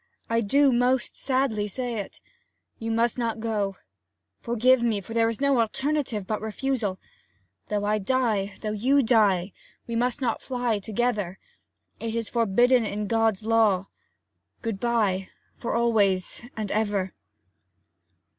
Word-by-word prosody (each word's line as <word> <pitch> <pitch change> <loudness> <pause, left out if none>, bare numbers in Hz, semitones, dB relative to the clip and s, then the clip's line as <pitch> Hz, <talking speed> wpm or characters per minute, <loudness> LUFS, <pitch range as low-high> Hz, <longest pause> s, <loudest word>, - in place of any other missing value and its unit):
I 230 0 +3
do 275 +5 +4
most 250 +1 +1
sadly 255 -6 0
say 240 +1 -3
it. 200 - -8 0.6
You 225 - -4
must 230 +2 +1
not 230 -2 -1
go. 210 -3 -1 0.6
Forgive 240 +2 +3
me, 230 -3 +1
for 210 +3 -9
there 230 0 +3
is 230 - -4
no 280 -2 +3
alternative 265 -2 -1
but 215 +2 -2
refusal. 220 -2 -2 0.7
Though 205 -1 -1
I 210 +1 +1
die, 210 -3 0
though 215 - -2
you 260 +7 +3
die, 205 -6 +3 0.3
we 235 - -4
must 245 +3 0
not 245 -4 -1
fly 245 -4 -1
together. 210 -3 -1 0.6
It 230 0 -3
is 230 -2 -2
forbidden 240 +2 +3
in 210 0 -3
God's 220 -1 +1
law. 215 -4 +3 0.7
Good 225 -4 -2
bye, 205 -6 0 0.3
for 235 - -3
always 210 -6 +2 0.2
and 215 -2 -3
ever!' 205 -3 0
225 Hz, 135 wpm, -26 LUFS, 205-245 Hz, 0.7 s, do